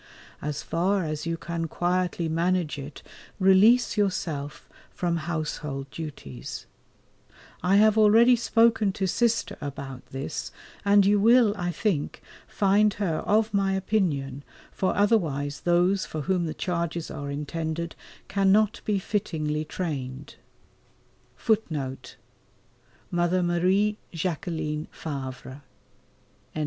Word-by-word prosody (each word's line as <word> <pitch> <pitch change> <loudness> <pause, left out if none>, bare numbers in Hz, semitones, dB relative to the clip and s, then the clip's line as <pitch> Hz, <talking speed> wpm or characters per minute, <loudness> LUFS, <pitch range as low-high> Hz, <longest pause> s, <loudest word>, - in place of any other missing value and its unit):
As 150 0 -4
far 185 +3 0
as 155 +1 -4
you 165 0 -1
can 170 0 -4
quietly 175 0 -1
manage 165 -1 0
it 140 +1 -9 0.4
release 205 +6 +5
yourself 160 -8 -2 0.2
from 170 -1 -1
household 150 -4 -4
duties. 105 - -7 1.0
I 185 +2 +3
have 215 +1 +5
already 225 +4 +6
spoken 225 -3 +3
to 195 - -1
Sister[A] 230 +4 0
about 135 -2 -6
this, 135 +1 -5 0.3
and 200 -1 +5
you 205 +1 +4
will, 230 0 +5
I 175 -3 -2
think, 175 -5 -1 0.3
find 205 +1 +3
her 180 -7 -1
of 215 +1 +2
my 195 -1 +2
opinion, 165 -9 -1 0.3
for 190 - -1
otherwise 155 -10 +1
those 180 +3 +2
for 155 - -4
whom 175 +2 0
the 155 - -4
charges 170 -2 -3
are 145 -2 -5
intended 160 +3 -4 0.3
cannot 200 +2 +2
be 210 -2 0
fittingly 155 -7 -2
trained. 140 -5 -5
175 Hz, 100 wpm, -26 LUFS, 150-205 Hz, 1.0 s, already